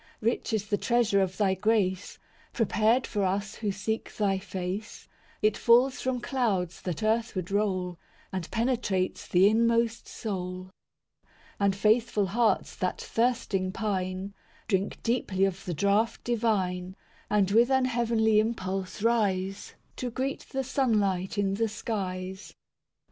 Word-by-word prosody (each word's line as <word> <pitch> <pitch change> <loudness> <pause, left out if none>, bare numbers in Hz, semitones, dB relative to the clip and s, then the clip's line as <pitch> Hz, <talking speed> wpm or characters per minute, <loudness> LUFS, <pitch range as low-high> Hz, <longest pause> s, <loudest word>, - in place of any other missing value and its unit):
III 225 - +5
Rich 240 - -5
is 210 -1 -1
the 205 -1 0
treasure 235 -5 +2
of 190 -1 -1
Thy 195 -3 +3
grace, 190 -1 0 0.4
Prepared 225 +2 +2
for 205 -3 -1
us 195 +2 -1
who 210 -2 -1
seek 215 +3 -3
Thy 195 -2 +1
face; 190 +2 -5 0.4
It 215 -1 +4
falls 245 +3 +4
from 255 -1 -1
clouds 205 -11 -1
that 180 0 -4
earthward 215 -5 0
roll, 185 -4 0 0.3
And 185 -3 -3
penetrates 225 -6 -1
the 185 +2 +5
inmost 230 +1 +2
soul. 185 -3 -5 0.5
IV - - -38 0.3
And 200 -1 +2
faithful 215 0 +2
hearts 225 +4 +1
that - - -1
thirsting 225 -6 0
pine, 190 -1 -2 0.3
Drink 195 -2 -1
deeply 205 -5 +1
of 195 0 -3
the 175 - -2
draught 200 +6 +1
divine, 190 -6 0 0.3
And 200 -2 +2
with 235 +4 +5
an 265 -1 +3
heavenly 230 -3 +2
impulse 195 -3 -2
rise, 195 -4 0 0.2
To 250 - -3
greet 265 +3 -3
the 270 0 -2
sunlight 210 -7 0
in 195 -1 +1
the 225 +3 +1
skies. 190 -3 -5
205 Hz, 140 wpm, -28 LUFS, 190-230 Hz, 0.5 s, III